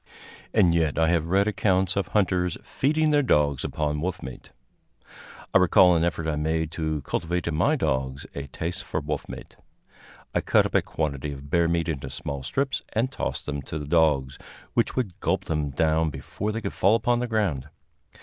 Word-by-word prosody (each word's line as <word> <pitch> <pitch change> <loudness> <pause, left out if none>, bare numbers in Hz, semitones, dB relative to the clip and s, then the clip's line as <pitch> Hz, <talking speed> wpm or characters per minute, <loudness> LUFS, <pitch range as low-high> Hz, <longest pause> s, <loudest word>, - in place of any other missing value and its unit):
And 95 -6 +4
yet 80 -3 +1
I 80 +1 +3
have 85 -2 +1
read 100 +4 +3
accounts 95 -3 +1
of 100 -4 0
hunters 90 -4 +1
feeding 155 +3 +1
their 145 -1 +4
dogs 75 - +2
upon 75 -1 -2
wolf 90 +2 -3
meat. 65 0 -9 1.0
I - - +7
recall 90 0 +6
an 80 - +2
effort 85 -1 -1
I 75 -2 0
made 80 +1 -1
to 80 -2 -2
cultivate 90 +1 -2
in 85 - -1
my 90 - +3
dogs 65 - -1
a 70 0 -5
taste 85 +7 -4
for 90 - -2
wolf 75 -1 -4
meat. - - -9 0.8
I - - +1
cut - - +3
up - - -4
a - - +4
quantity 75 -2 -3
of 70 0 -9
bear 85 -1 +3
meat 85 -1 0
into 70 -5 -3
small 70 -2 -5
strips 135 - -1
and 120 +4 0
tossed - - -3
them 70 -1 -3
to 75 - -6
the 75 - -5
dogs, 75 -4 +2 0.3
which - - +1
would 110 -9 -2
gulp - - 0
them 75 -3 -1
down 80 +3 +1
before 105 +7 -4
they 115 +2 -3
could - - -4
fall 100 +4 +4
upon 120 +1 +1
the 125 - -1
ground. 90 - -1
80 Hz, 195 wpm, -25 LUFS, 75-95 Hz, 1.0 s, I